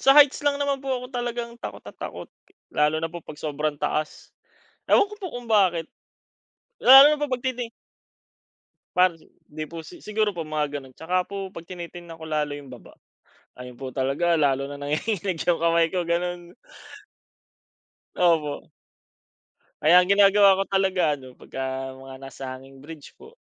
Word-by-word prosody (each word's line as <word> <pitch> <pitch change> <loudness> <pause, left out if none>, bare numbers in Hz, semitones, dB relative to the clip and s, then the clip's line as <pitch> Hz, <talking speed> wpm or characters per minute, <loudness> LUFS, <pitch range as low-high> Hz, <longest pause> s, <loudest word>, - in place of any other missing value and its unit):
sa 270 +2 +5
heights 290 -2 +7
lang 285 -1 +2
naman 280 -1 -1
po 275 - -7
ako 250 -1 -2
talagang 240 -1 -3
takot - - -7
na - - -10
takot, - - -7 0.4
lalo 150 +1 +2
na 165 +1 -2
'pag 160 -3 -9
sobrang 150 0 -2
taas, 155 0 -3 0.5
ewan - - +4
ko 420 - -9
po 385 -3 -6
kung 245 -1 -7
bakit? 180 -6 +3 0.9
Lalo 270 +4 +10
na 300 - -4
pagtiti 250 -2 -3 1.3
Para 180 -1 +4
sa 165 - -21 0.3
di 155 +1 -5
po 165 -1 -7
si 350 - -13
siguro 210 -1 0
po 165 - -3
mga 150 -2 -2
gano'n. 130 -1 -14
Tsaka 180 +5 0
po 195 -1 -6
'pag 170 0 -9
tinitingnan 175 -2 -9
ko 160 - -9
lalo 150 -2 -1
yung 140 -2 -12
baba. 120 - -15 0.7
Ayun 125 -1 -9
po 130 -1 -7
talaga 155 +5 +1
lalo 140 -1 +2
nang 145 0 -8
nanginginig 190 +3 -1
yung 175 -2 +1
kamay 165 0 +3
ko 185 - 0
ganun. 175 0 -2 1.6
Opo. 160 -5 +1 1.1
Kaya 160 +4 +6
ang 195 - +2
ginagawa 200 -1 +6
ko - - +1
talaga 185 -5 +1
ano 130 -2 -13
'pagka 130 +1 -6
mga 135 0 -11
nasa 135 -1 -7
hanging 135 +1 -13
bridge 155 -2 -11
po 455 - -15
170 Hz, 160 wpm, -24 LUFS, 150-205 Hz, 1.6 s, Lalo